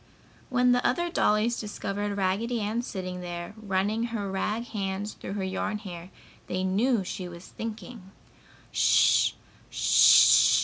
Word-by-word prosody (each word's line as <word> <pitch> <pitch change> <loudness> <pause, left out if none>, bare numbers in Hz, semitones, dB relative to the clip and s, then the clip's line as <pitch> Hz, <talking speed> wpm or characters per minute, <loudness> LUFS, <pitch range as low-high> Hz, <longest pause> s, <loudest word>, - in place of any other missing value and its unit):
When 250 -1 +3
the 245 0 +2
other 345 +7 0
dollies 220 -3 +1
discovered 205 -1 -4
Raggedy 205 +5 -1
Ann 215 +3 -2
sitting 185 -6 -6
there, 175 +1 -6
running 210 +1 -1
her 215 -5 -4
rag 210 +4 -2
hands 200 -1 -4
through 195 - -8
her 200 -1 -3
yarn 190 +3 -2
hair, 180 -4 -9 0.4
they 185 +1 -2
knew 210 +4 +1
she 185 0 -6
was 175 +1 -11
thinking. 225 -2 -8
205 Hz, 125 wpm, -27 LUFS, 190-230 Hz, 0.4 s, When